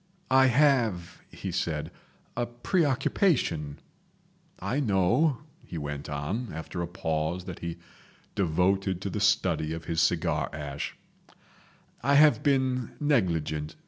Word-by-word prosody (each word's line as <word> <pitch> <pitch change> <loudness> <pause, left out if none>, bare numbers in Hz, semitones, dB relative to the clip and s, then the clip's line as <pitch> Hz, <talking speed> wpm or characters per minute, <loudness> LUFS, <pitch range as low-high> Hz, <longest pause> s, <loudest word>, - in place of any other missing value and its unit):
"I 130 0 +6
have" 120 - +2
he 95 - -6
said, 80 -3 -2 0.4
"a 120 0 -1
preoccupation—" 130 - +1 0.8
"I 100 +9 -1
know," 115 - +2 0.3
he 85 - -7
went 75 -1 -5
on, 85 - -3
after 80 +2 -5
a 85 - -2
pause 80 0 -2
that 90 -2 -7
he 85 0 -5 0.6
devoted 95 +1 +1
to 100 - -3
the 105 - -2
study 95 -6 +2
of 80 -1 -6
his 80 +1 0
cigar 85 0 +1
ash, 75 -1 -5 1.0
"I 140 +3 +3
have 150 +1 +6
been 130 -3 +1
negligent. 85 - 0
95 Hz, 120 wpm, -28 LUFS, 80-125 Hz, 1.0 s, I